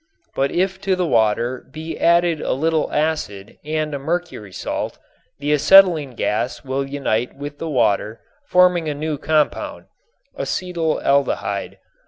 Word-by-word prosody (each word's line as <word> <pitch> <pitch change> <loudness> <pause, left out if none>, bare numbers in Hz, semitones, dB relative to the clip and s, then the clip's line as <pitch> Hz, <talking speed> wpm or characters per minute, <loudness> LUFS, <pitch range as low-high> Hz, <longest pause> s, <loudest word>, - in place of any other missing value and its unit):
But 135 +1 0
if 190 +2 -1
to 190 -1 +1
the 180 -1 0
water 120 -1 +1
be 160 +2 -6
added 170 -1 +3
a - - -1
little 160 +3 0
acid 150 -11 -2
and 155 0 -2
a 140 - -3
mercury 160 - -4
salt, - - -4 0.4
the 145 +1 0
acetylene 160 -4 +5
gas 115 +3 -2
will 135 0 -2
unite 125 -4 -1
with 145 +1 -8
the 165 - -4
water 110 -4 +1 0.3
forming 180 - +3
a 145 - -3
new 150 0 -3
compound, 155 -1 0 0.5
acetaldehyde. 155 - -1
150 Hz, 135 wpm, -20 LUFS, 130-165 Hz, 0.5 s, acetylene